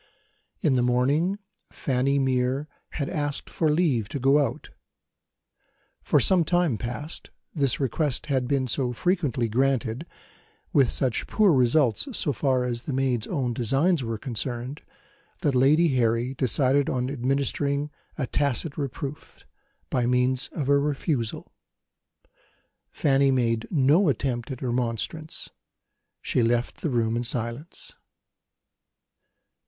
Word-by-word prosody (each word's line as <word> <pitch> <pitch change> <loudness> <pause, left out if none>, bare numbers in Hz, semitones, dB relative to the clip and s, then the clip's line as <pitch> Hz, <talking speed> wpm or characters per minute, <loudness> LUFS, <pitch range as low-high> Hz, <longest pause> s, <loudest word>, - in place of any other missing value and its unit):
In 150 - +2
the - - +2
morning, 140 +10 +1 0.3
Fanny 135 +1 0
Mere 130 +1 0 0.3
had 140 -3 -2
asked 145 -2 -3
for 160 - +1
leave 150 - +1
to 140 - -4
go 135 +3 +4
out. - - -5 1.3
For - - +2
some 185 -3 +7
time 170 - +1
past 135 +7 -6 0.2
this 140 -6 +1
request 140 +1 -1
had 130 -4 0
been 135 -1 +1
so 125 0 -1
frequently 150 - 0
granted, 130 +3 0 0.7
with 135 -4 +4
such 130 -4 0
poor 205 -5 +3
results 135 - +2
so 145 - +1
far 130 -1 +1
as 120 -1 -2
the 140 - -5
maid's 130 -4 0
own 130 -8 -1
designs 135 - +1
were 115 -1 -3
concerned, 125 +3 -5 0.6
that 145 - +1
Lady 150 +6 +4
Harry 120 -1 +1
decided 135 +2 +1
on 125 -1 -1
administering 140 +2 -1 0.3
a 140 - -1
tacit 140 +3 -1
reproof, 140 +1 -6 0.5
by 125 -2 +1
means 125 +1 +1
of 145 -5 -3
a 140 0 +4
refusal. 140 -4 -2 1.4
Fanny 140 -1 +2
made 115 -4 +1
no 155 +4 +3
attempt 125 -2 -2
at 130 -2 -6
remonstrance; 125 +6 -3 0.7
she - - +1
left 120 +1 0
the 160 - -1
room 115 -3 0
in 120 - -1
silence. 120 +6 -4
135 Hz, 125 wpm, -25 LUFS, 125-145 Hz, 1.4 s, some